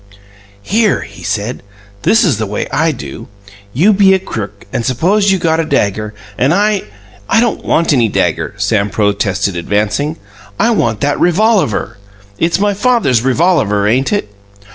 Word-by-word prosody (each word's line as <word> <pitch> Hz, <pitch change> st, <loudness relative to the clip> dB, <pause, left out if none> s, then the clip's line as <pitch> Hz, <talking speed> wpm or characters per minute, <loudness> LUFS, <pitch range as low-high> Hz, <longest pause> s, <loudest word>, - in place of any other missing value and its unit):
"Here," 215 Hz, -, +1 dB
he 100 Hz, 0 st, -11 dB
said, 105 Hz, +4 st, -3 dB, 0.4 s
"this 225 Hz, -, +3 dB
is 145 Hz, -, +1 dB
the 110 Hz, -, -2 dB
way 105 Hz, -, -3 dB
I 160 Hz, +4 st, +1 dB
do: 75 Hz, -, -8 dB, 0.4 s
You 175 Hz, -, +3 dB
be 190 Hz, -1 st, +5 dB
a -, -, 0 dB
crook; 105 Hz, -, -7 dB
and 120 Hz, -, -1 dB
suppose 190 Hz, -, +1 dB
you 190 Hz, -, +2 dB
got 165 Hz, -2 st, 0 dB
a -, -, +2 dB
dagger, 105 Hz, -7 st, -1 dB, 0.2 s
and 135 Hz, +6 st, +3 dB
I 205 Hz, 0 st, +1 dB, 0.2 s
" 95 Hz, -1 st, -24 dB
"I -, -, +4 dB
don't 235 Hz, -1 st, 0 dB
want 165 Hz, -1 st, +1 dB
any 120 Hz, -4 st, +3 dB
dagger," 100 Hz, -, -1 dB
Sam 100 Hz, 0 st, 0 dB
protested, 100 Hz, -2 st, 0 dB
advancing. 105 Hz, -, -1 dB, 0.4 s
"I 235 Hz, -, +3 dB
want 115 Hz, -, 0 dB
that 145 Hz, 0 st, 0 dB
revolaver. 185 Hz, -, +1 dB, 0.4 s
It's 170 Hz, +3 st, +1 dB
my 205 Hz, 0 st, +1 dB
father's 205 Hz, -, +2 dB
revolaver, 130 Hz, -, +1 dB
ain't 130 Hz, +5 st, +1 dB
it?" 205 Hz, -, -1 dB
135 Hz, 165 wpm, -14 LUFS, -, 0.4 s, be